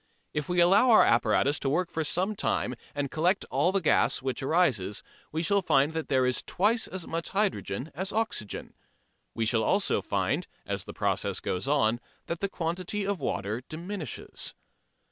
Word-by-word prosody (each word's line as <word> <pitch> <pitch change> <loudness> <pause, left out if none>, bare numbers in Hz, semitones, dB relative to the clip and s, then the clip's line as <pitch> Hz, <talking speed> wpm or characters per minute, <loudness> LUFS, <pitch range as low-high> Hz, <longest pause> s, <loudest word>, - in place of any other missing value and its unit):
If 150 +1 -3
we 180 0 +1
allow 190 +8 +6
our 225 - +8
apparatus 120 +5 +3
to 135 - -1
work 175 +5 0
for 160 - -1
some 185 +7 0
time, 125 - 0 0.2
and 140 -2 -2
collect 175 +5 +1
all 180 - +2
the 195 - +2
gas 155 - +3
which 130 +1 -3
arises, 130 - +1 0.3
we 160 +2 -1
shall 200 +3 +3
find 150 -3 +3
that 160 -1 -3
there 130 -2 +2
is 125 -1 +1
twice 220 +5 +1
as 180 -2 -6
much 165 +1 -3
hydrogen 195 -7 -1
as 190 +6 -3
oxygen. 220 - -3 0.6
We 115 - 0
shall 110 +1 +2
also 195 - +2
find, - - -1 0.2
as - - -3
the - - -8
process - - -1
goes 90 +1 -3
on, 120 -5 +2 0.3
that 170 - -4
the 200 - -1
quantity 180 +4 -3
of 200 -2 -1
water 110 -4 -2
diminishes. 170 - -5
165 Hz, 175 wpm, -28 LUFS, 135-190 Hz, 0.6 s, our